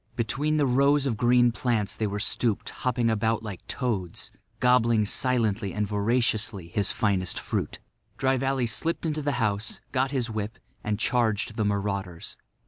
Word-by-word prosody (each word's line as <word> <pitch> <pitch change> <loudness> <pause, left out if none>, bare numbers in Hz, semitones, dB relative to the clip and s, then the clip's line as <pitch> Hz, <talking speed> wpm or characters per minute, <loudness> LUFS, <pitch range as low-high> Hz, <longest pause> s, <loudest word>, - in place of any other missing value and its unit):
Between 145 +7 0
the 145 - +3
rows 140 +2 +3
of 125 -5 0
green 120 +1 +4
plants 115 -3 -1
they 110 - -1
were 100 +1 -3
stooped, 110 +1 0
hopping 125 -2 0
about 110 0 +1
like 105 -4 -6
toads, 105 -10 -3 0.3
gobbling 120 -3 +4
silently 110 -4 +1
and 105 0 0
voraciously 105 -3 0
his 100 +3 +1
finest 95 -4 0
fruit. - - -3 0.4
Dry 135 0 +2
Valley 135 -1 0
slipped 165 +10 -1
into 155 -1 -1
the 145 0 0
house, 110 -3 -1
got 130 0 +1
his 130 -4 -1
whip, 110 -1 -4 0.3
and 105 -1 -1
charged 110 -2 0
the 110 - 0
marauders. 100 -4 -2
115 Hz, 155 wpm, -27 LUFS, 105-125 Hz, 0.4 s, green